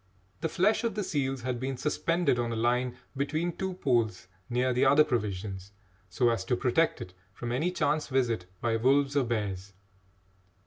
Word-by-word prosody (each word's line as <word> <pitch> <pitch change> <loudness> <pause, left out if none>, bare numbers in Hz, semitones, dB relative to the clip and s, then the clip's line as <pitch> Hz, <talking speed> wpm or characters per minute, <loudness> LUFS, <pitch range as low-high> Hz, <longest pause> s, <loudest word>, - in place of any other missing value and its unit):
The 160 - -1
flesh 195 +9 +2
of 230 - -1
the 210 - -1
seals 135 -6 -2
had 125 -1 -2
been 130 +1 -3
suspended 165 -1 +1
on 120 -1 -1
a - - -2
line 125 +2 0 0.2
between 155 +5 -1
two 190 -1 -3
poles 115 - 0 0.2
near 125 +1 +1
the 125 - +2
other 145 +3 +6
provisions 100 -7 -3 0.4
so 125 -2 +2
as 115 - -1
to 125 - +1
protect 155 +7 +1
it 90 - -8 0.2
from 120 +3 -5
any 150 +9 +1
chance 155 -3 0
visit 120 -9 0
by 115 -1 +1
wolves 140 +4 +3
or 140 -3 +3
bears. 100 -4 -3
125 Hz, 175 wpm, -29 LUFS, 115-150 Hz, 0.4 s, other